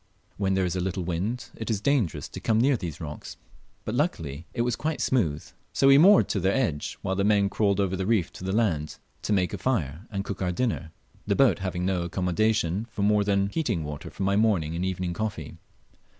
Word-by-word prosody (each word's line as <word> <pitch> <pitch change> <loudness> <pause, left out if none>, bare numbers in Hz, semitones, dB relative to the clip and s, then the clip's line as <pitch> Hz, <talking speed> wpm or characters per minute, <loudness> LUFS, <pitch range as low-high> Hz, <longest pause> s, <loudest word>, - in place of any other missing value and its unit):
When 95 -1 +1
there 95 -1 +2
is 90 0 -2
a - - -1
little 95 0 -2
wind, 95 +9 -3
it 110 - -6
is 110 -3 0
dangerous 105 - 0
to - - -7
come 110 -1 +1
near 135 +3 +4
these 85 - -5
rocks; 75 -3 -7 0.5
but 110 - -3
luckily 85 - -2
it 120 - -1
was 120 -1 0
quite 155 0 -2
smooth, 80 - 0 0.3
so 135 - +4
we 135 +1 +8
moored 195 +5 +7
to 100 - 0
their 95 +2 +1
edge, 105 - -1
while 95 - -1
the 100 - +1
men 100 -1 +3
crawled 100 -2 +1
over 95 -1 +1
the 95 0 -2
reef 105 -8 +1
to - - -10
the 95 - -2
land, 90 -9 0 0.2
to - - -3
make; 95 -3 +1
a - - -4
fire 90 - -1
and 100 -2 -3
cook 100 -2 -5
our 90 -1 0
dinner 90 -5 -2 0.4
the - - +2
boat - - +4
having 90 -2 -2
no 95 -2 0
accommodation 90 +2 0
for 110 -3 -4
more 105 0 +3
than 100 -1 +1
heating 110 - -1
water 75 -1 -6
for - - -5
my 100 +1 +2
morning 100 -7 +2
and 85 - -2
evening 90 -1 -2
coffee. 100 -7 -4
100 Hz, 220 wpm, -26 LUFS, 90-110 Hz, 0.5 s, we